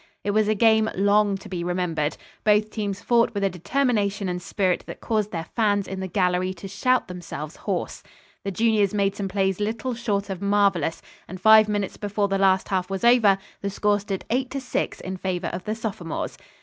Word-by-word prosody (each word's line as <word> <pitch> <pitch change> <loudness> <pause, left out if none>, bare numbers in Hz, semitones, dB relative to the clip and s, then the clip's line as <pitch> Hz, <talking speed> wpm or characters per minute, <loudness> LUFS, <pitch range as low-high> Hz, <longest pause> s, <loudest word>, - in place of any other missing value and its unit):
It 205 - 0
was 215 0 +2
a 215 - +2
game 220 0 +4
long 205 +1 +3
to 195 - -12
be 175 -2 -4
remembered. 170 -4 -1 0.3
Both 215 0 +3
teams 205 -2 -3
fought 235 -2 +2
with 200 - -1
a 195 - +2
determination 205 - 0
and 180 0 -3
spirit 185 0 0
that - - -8
caused 215 -3 -1
their 165 -2 -4
fans 205 -3 +2
in 190 - -5
the 190 - -3
gallery 185 0 0
to 185 +3 -8
shout 255 +6 +1
themselves 170 -4 -7
hoarse. - - -3 0.4
The 200 - -2
juniors 210 0 +2
made 200 -1 +1
some 200 - -3
plays 190 0 0
little 225 +4 -2
short 210 -4 -2
of 190 -1 -5
marvellous, 200 -5 +1 0.2
and 185 +1 -8
five 220 +2 +7
minutes 205 -2 -2
before 205 0 -1
the 195 0 0
last 190 -1 +3
half 185 -1 -1
was 195 +1 -4
over 235 -5 +5 0.2
the 200 - -2
score 205 +1 +1
stood 195 -1 -5
8 255 +1 0
to 275 - -3
6 255 - -3
in 190 0 -5
favor 180 -1 -2
of 180 +1 -5
the 215 - -2
sophomores. 195 -7 -4
200 Hz, 200 wpm, -24 LUFS, 185-215 Hz, 0.4 s, five